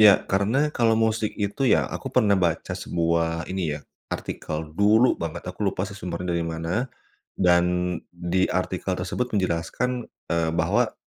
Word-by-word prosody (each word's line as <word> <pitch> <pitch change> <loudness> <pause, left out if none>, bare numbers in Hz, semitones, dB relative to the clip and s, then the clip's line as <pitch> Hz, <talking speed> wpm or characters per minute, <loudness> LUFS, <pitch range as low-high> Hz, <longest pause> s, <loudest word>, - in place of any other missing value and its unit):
Iya. 105 -2 +10 0.2
Karena 100 +7 +2 0.2
kalau 115 -2 +3
musik 110 -1 +1
itu 105 +6 -1
ya, - - +2
aku - - -6
pernah 100 -2 +5
baca 85 -4 0
sebuah 85 0 0
ini, 95 0 -2 0.2
ya, - - -15 0.3
artikel, 75 - -4 0.2
dulu 110 +5 +6
banget 80 -2 -4
aku - - -17
lupa 95 - -3
sih 100 - -9
sumbernya 90 0 -4
dari 85 -1 0
mana, 80 +1 -4 0.6
dan 90 -1 +4 0.5
di 90 +2 +1
artikel 95 +1 -2
tersebut 95 +8 -2
menjelaskan, 100 +7 -1 0.3
eee, 85 -1 +1
bahwa - - +2
95 Hz, 150 wpm, -25 LUFS, 85-105 Hz, 0.6 s, Iya